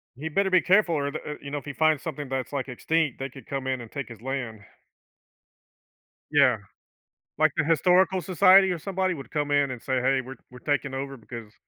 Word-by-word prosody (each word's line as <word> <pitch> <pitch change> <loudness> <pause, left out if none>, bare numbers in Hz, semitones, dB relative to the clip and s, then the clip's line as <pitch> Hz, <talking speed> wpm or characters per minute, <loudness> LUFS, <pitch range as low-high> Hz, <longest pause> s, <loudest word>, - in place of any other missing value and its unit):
He 155 +5 -5
better 195 +4 +1
be 185 -1 +4
careful 185 -3 +3
or 140 -1 -1
the 155 - -5
uh, - - -5
you 140 - -8
know, 145 - -2
if 140 - -8
he 145 - -6
finds 155 -1 +2
something 145 -4 -6
that's, 135 +1 -3
like, 135 -1 -3
extinct, 155 +2 -1
they 135 0 -4
could 135 +1 -13
come 135 -1 -4
in 130 -2 -1
and 115 - -11
take 140 -3 -5
his 115 -3 -12
land. 125 -5 -4 1.7
Yeah. 140 -5 +5 0.8
Like, 155 -1 +4
the - - +1
historical 180 +4 +3
society 185 +3 +5
or 175 - -3
somebody 190 +1 -1
would 140 -5 -9
come 150 -1 -1
in 145 -2 +2
and 125 -3 -7
say, 130 -2 -1
"Hey. 135 +1 +2
We're 130 +1 -9 0.2
we're 125 - -12
taking 140 -1 -1
over 135 0 -5
because 115 -1 -10
140 Hz, 215 wpm, -26 LUFS, 130-160 Hz, 1.7 s, Yeah